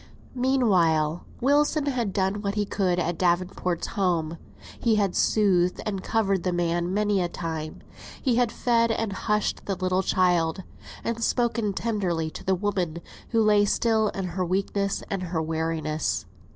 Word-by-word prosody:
Meanwhile, 180 - +2 0.2
Wilson 290 +3 +3
had 245 -7 -1
done 195 +1 0
what 200 -1 -2
he 210 -1 +1
could 190 -3 0
at 175 -1 -1
Davenport's 180 -1 0
home. 170 -4 -1 0.4
He 230 -2 +2
had 200 -3 +1
soothed, 180 -4 +2
and 200 -3 -2
covered 195 -4 +1
the 180 - -1
man 175 0 0
many 205 -1 +1
a 175 - -1
time; 160 -3 -5 0.4
he 250 -4 +1
had 245 -2 +2
fed 230 -1 +2
and 225 -2 -1
hushed 210 +1 -1
the 195 - 0
little 185 0 0
child, 180 -2 +1 0.4
and 230 0 -2
spoken 230 -4 +1
tenderly 185 -8 -1
to - - -9
the 190 - +2
woman, 185 -4 -1 0.3
who 225 -2 +3
lay 210 -1 +5
still 220 +1 +2
in 195 -2 -4
her 185 +2 -2
weakness 195 +2 -1
and 195 -2 -1
her 175 -2 -2
weariness. 160 - -1
190 Hz, 155 wpm, -26 LUFS, 175-215 Hz, 0.4 s, lay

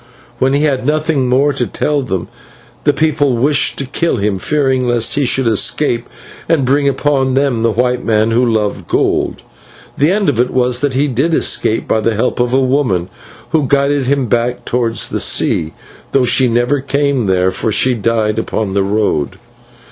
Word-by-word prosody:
When 130 +1 +2
he 145 +2 +1
had 135 -4 0
nothing 150 -2 0
more 140 +3 +2
to 135 - -2
tell 150 -1 -1
them, 95 -9 -3 0.6
the 145 - +5
people 145 -3 0
wished 145 +4 +1
to 140 - -1
kill 165 +5 -1
him, 100 -1 -1
fearing 135 +2 0
lest 120 -2 +1
he 145 -1 0
should 130 +1 0
escape 115 +2 0 0.4
and 155 -5 +2
bring 140 +2 +2
upon 135 -2 0
them 135 -4 +1
the 115 - +2
white 125 +2 0
men 110 0 +1
who 120 +2 +2
loved 110 -4 -1
gold. - - -1 0.6
The 145 +3 +3
end 200 +1 +1
of 135 -6 0
it 125 +1 +2
was 125 -1 0
that 140 -2 -1
he 140 +3 +2
did 140 +6 0
escape 110 - 0
by 110 - +1
the 115 0 0
help 125 +4 -1
of 120 0 +1
a 130 - +3
woman, 125 -10 0 0.4
who 155 -4 +1
guided 140 -1 +1
him 140 -1 +1
back 120 +1 -1
towards 115 -2 0
the - - -3
sea, 80 -1 0 0.4
though 135 -2 +3
she 125 +1 +3
never 120 +4 +1
came 140 -4 0
there, 95 0 +2
for 110 - -2
she 125 +5 +2
died 110 -1 0
upon 110 -3 -3
the 100 - +1
road. 100 -8 -1
125 Hz, 185 wpm, -15 LUFS, 115-140 Hz, 0.6 s, the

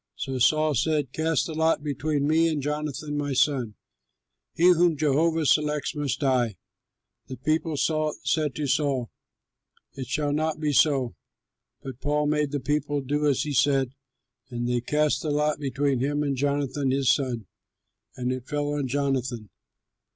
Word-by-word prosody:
So 130 -1 -4
Saul 155 +4 +3
said, 145 +1 0
"Cast 160 -4 +1
the 160 - -5
lot 160 -1 +1
between 145 0 -1
me 160 +2 +3
and 155 -2 -1
Jonathan 150 +1 -3
my 145 -1 -2
son. 130 -5 +1 0.8
He 175 +2 +5
whom 170 -2 +3
Jehovah 155 +2 +2
selects 150 0 +1
must 145 -1 -2
die." 125 -6 +1 0.7
The 130 - -7
people 155 +2 -1
said 155 -1 0
to 150 - -2
Saul, 135 -3 0 0.8
"It 130 -2 -6
shall 145 +3 -1
not 155 +1 -1
be 150 -2 0
so!" 135 -4 +3 0.7
But 130 -2 -8
Saul 150 +1 0
made 150 0 +1
the 145 0 -2
people 145 +1 -1
do 145 +3 0
as 140 - +2
he 150 - -3
said, 135 -1 +2 0.6
and 120 -1 -3
they 120 -1 0
cast 150 +4 +1
the 155 - -3
lot 150 +1 +1
between 140 -1 0
him 145 +3 0
and 140 -2 -1
Jonathan 140 0 -1
his 135 -1 +3
son; 125 -6 -2 0.7
and 125 0 -2
it 130 -1 -5
fell 145 -1 -2
on 145 -2 -1
Jonathan. 130 -5 -2
145 Hz, 160 wpm, -26 LUFS, 130-150 Hz, 0.8 s, He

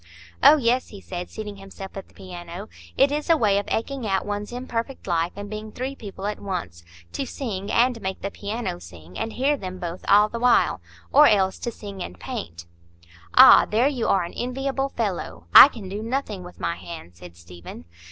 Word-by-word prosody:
"Oh, 310 - +8
yes," 250 -1 +1
he 205 - -11
said, 180 -2 -7
seating 210 -2 -7
himself 195 0 -10
at 195 - -7
the - - -26
piano, 180 +2 -9 0.3
"it 275 +1 +4
is 300 +3 -3
a 330 - +5
way 205 -5 +3
of 205 - -6
eking 250 +1 -2
out 195 -1 0
one's 205 +1 -4
imperfect 245 +1 -5
life 170 -2 0
and 205 0 -7
being 215 +1 -7
three 260 +4 -4
people 200 -6 -9
at 210 0 -3
once,—to 85 - -6
sing 205 -8 -5
and 240 -1 +2
make 190 -1 -4
the 200 - -3
piano 210 - -4
sing, 85 0 -13
and 225 - -4
hear 280 +3 +1
them 185 -7 -7
both 175 0 -6
all 205 +1 +6
the 235 +2 -6
while,—or 250 +4 +3
else 190 -2 +2
to 240 - -3
sing 200 -4 -9
and 90 - -7
paint." 85 0 -7 0.7
"Ah, - - +9
there 230 +5 +3
you 260 -5 -1
are 190 -2 +3
an 170 - -7
enviable 270 +2 -2
fellow. 175 - -4
I - - +12
can 225 -9 -9
do 200 +3 -5
nothing 225 -4 -3
with 180 0 -12
my 170 - -2
hands," 90 - -10
said 85 -1 -12
Stephen. 85 -1 -11
205 Hz, 195 wpm, -24 LUFS, 175-240 Hz, 0.7 s, I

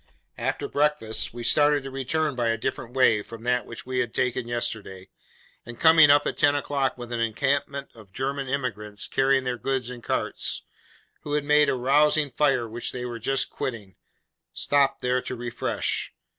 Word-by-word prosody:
After - - -2
breakfast, 145 -7 0
we 120 0 -7
started 145 +3 +3
to 135 - -7
return 140 +3 -1
by 120 -2 0
a 115 0 +1
different 125 +1 -4
way 115 -5 +4
from 115 +2 -11
that 125 0 0
which 115 - -9
we 130 0 -2
had 120 -2 -2
taken 125 -2 0
yesterday, 110 -5 -3 0.5
and 120 -1 -10
coming 160 -2 +7
up 145 0 +5
at - - -3
ten 145 0 +4
o'clock 140 -2 -1
with 120 -1 -8
an 120 - -2
encampment 140 +4 -1
of 110 -4 -16
German 135 +4 -3
emigrants 105 -7 -3
carrying 135 0 +2
their 125 -1 -3
goods 130 0 -2
in 125 -1 -8
carts, - - -2 0.6
who 145 - -5
had 150 -1 +1
made 150 +1 +4
a - - +1
rousing 145 +3 +3
fire 130 -2 +2
which 115 +2 -4
they 125 -1 -5
were 120 -1 -5
just 135 +4 -1
quitting, 105 -7 -5 0.6
stopped 140 -1 +1
there 125 0 +1
to 130 - -5
refresh. 120 -1 -2
130 Hz, 180 wpm, -25 LUFS, 115-140 Hz, 0.6 s, coming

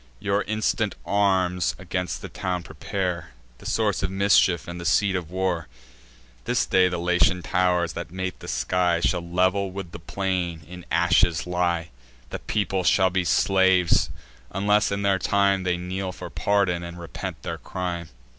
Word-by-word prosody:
Your 100 +1 0
instant 110 0 0
arms 95 -3 +1
against 90 0 -4
the - - -4
town 90 -1 -3
prepare, 90 -4 -4 0.3
The - - -9
source 105 -4 +1
of 90 - 0
mischief, 95 -4 +3
and 85 0 -6
the - - -6
seat 95 +3 +2
of 85 -3 -3
war. 90 -3 -1 0.8
This - - +1
day 95 -1 +4
the 90 - -2
Latian 90 +1 +2
tow'rs, 90 -2 +1
that - - -6
mate 95 +1 -4
the - - -10
sky, 85 +8 +1
Shall 90 +1 +1
level 95 +3 +1
with 95 -2 -7
the 85 - -8
plain 90 -2 -2
in 90 0 -10
ashes 85 -1 +3
lie: 85 -1 0 0.4
The - - -4
people 95 -3 -1
shall 95 +1 +4
be 90 0 +1
slaves, 95 -1 +3 0.4
unless 105 +2 +2
in 100 0 -1 0.2
time 100 -1 +2
They 90 -1 +1
kneel 90 +1 -4
for - - -9
pardon, 100 -4 +1
and 85 0 -7
repent 85 -3 -6
their - - -4
crime. 85 -3 -4
90 Hz, 160 wpm, -25 LUFS, 85-95 Hz, 0.8 s, day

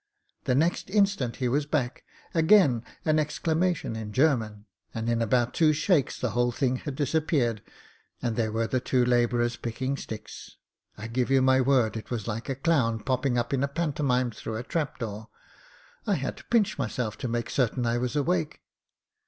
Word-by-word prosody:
The 125 - +2
next 165 +6 +1
instant 200 - +1
he 125 - -1
was 145 +4 0
back, 135 -5 -1 0.3
again 160 - +5 0.2
an 155 0 +3
exclamation 160 -1 0
in 110 -1 -5
German, 110 -7 +1 0.3
and 115 0 -3
in 115 0 +1
about 120 +1 +1
two 155 -2 +4
shakes 155 -1 +1
the 125 - -1
whole 120 +3 +1
thing 130 +1 0
had 140 +1 -6
disappeared, 140 - 0 0.6
and 120 -3 -2
there 110 -2 0
were 115 +1 0
the 130 +3 0
two 125 0 +1
labourers 120 -1 +2
picking 130 +4 -3
sticks. 110 -5 -9 0.4
I 105 - -7
give 120 +2 -1
you 135 -1 +4
my 130 0 +4
word 125 -4 +2
it 110 - -7
was 115 -4 -4
like 115 +2 -4
a 135 - -1
clown 130 -7 +1
popping 130 +1 0
up 120 +2 -1
in 135 - +1
a - - +2
pantomime 140 -5 0
through 110 0 -6
a 115 - -4
trap 150 +1 -2
door; 110 -1 -6 0.8
I - - +3
had - - -3
to - - -13
pinch 210 -7 +1
myself 115 -3 -2
to - - -3
make 120 0 -2
certain 125 -1 0
I 120 +1 +1
was 125 +3 -2
awake. 90 - 0
125 Hz, 185 wpm, -27 LUFS, 115-145 Hz, 0.8 s, again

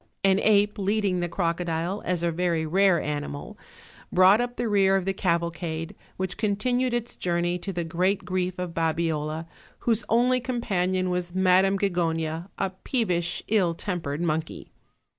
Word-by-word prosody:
An 195 0 +4
ape 210 0 +3
leading 200 -2 +1
the 175 0 -1
crocodile, 170 +2 -1
as 180 -2 0
a 170 - +1
very 170 -1 0
rare 190 +2 +3
animal, 145 -1 -4 0.6
brought 185 +5 +6
up 245 0 -3
the 240 - -2
rear 195 -2 +3
of 190 -2 0
the 195 - 0
cavalcade, 170 -2 -2 0.2
which 185 -1 -3
con 210 -2 +1
tinued 250 +4 0
its 240 0 -2
journey 175 0 -1
to 195 - -4
the 175 -2 -2
great 180 +4 0
grief 185 -1 -2
of 180 -2 -4
Babiola, 160 -1 -1 0.4
whose 230 -1 +1
only 250 +2 +3
companion 190 -7 -1
was 180 0 -3
Madam 190 +1 +4
Gigona, 165 -3 -1
a 195 -1 -1
peevish, 185 -4 -1
ill 190 -6 +2
tempered 165 -6 -3
monkey. 160 -1 -3
180 Hz, 155 wpm, -26 LUFS, 170-200 Hz, 0.6 s, brought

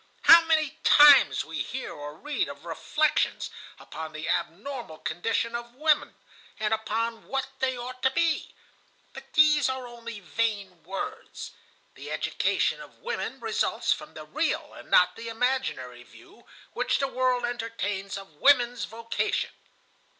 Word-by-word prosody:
How 335 0 +10
many 315 -1 +1
times 290 -2 +7
we 160 -1 -4
hear 260 - -5
or 145 0 -8
read 295 - -2
of - - -10
reflections 310 0 0 0.3
upon 160 -1 -8
the 155 +1 -6
abnormal 205 - -3
condition 225 +9 -2
of 235 0 -6
women, 305 +2 +2 0.4
and 215 0 0
upon 225 +1 -2
what 270 -1 -1
they 260 -1 0
ought 255 +1 -7
to 265 - +4
be. 330 +3 0 0.6
But - - -12
these 300 -3 +5
are 260 -1 -3
only 235 -2 -8
vain 200 -2 -2
words. 195 - -6 0.4
The - - -10
education - - 0
of - - -13
women 485 - -4
results - - 0
from - - -11
the - - -8
real - - -2
and - - -13
not 180 +3 +4
imaginary 230 - -2
view 355 - -18 0.3
which - - +1
the 275 - 0
world 255 -2 +1
entertains 205 -5 -3
of 195 -4 -11
women's 245 -3 +4
vocation. 230 +1 -2
235 Hz, 140 wpm, -27 LUFS, 200-265 Hz, 0.6 s, How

